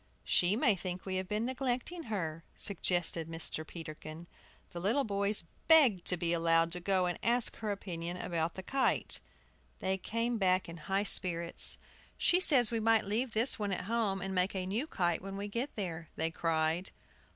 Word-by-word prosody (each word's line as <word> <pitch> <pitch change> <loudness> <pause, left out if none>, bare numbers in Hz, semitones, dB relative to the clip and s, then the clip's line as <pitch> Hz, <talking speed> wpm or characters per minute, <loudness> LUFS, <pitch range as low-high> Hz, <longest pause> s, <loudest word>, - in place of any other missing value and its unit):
"She 180 +3 +2
may 225 -2 +3
think 180 -1 -5
we 190 -1 -2
have 185 0 -3
been 210 +3 -1
neglecting 260 +6 -2
her," 165 -7 -3
suggested 175 -4 -1
Mr. 165 -1 -3
Peterkin. 155 0 -8 0.5
The 175 - -6
little 220 +10 +1
boys 200 -2 0 0.2
begged 270 - +6
to 180 - +5
be 170 0 0
allowed 165 0 +3
to 180 - -3
go 185 0 +1
and 175 -1 -2
ask 240 +1 +3
her 215 -2 -3
opinion 175 -3 -5
about 165 -2 -2
the 190 - -6
kite. 270 +6 0 0.6
They 190 0 -1
came 230 +4 -1
back 185 -1 +2
in 170 0 -8
high 195 +5 -1
spirits. 170 -4 +3 0.4
"She 355 - +3
says 260 - +5
we 230 - 0
might 225 -1 +3
leave 225 +4 -1
this 230 +2 +1
one 205 -1 -1
at 185 - -2
home, 210 -3 0
and 195 0 -3
make 185 +1 +1
a 185 -1 -2
new 220 +10 -2
kite 175 - 0
when 195 +1 -6
we 200 +1 -4
get 235 +7 -3
there," 170 -5 -5
they 160 +1 -1
cried. 165 +2 0
190 Hz, 185 wpm, -32 LUFS, 170-225 Hz, 0.6 s, begged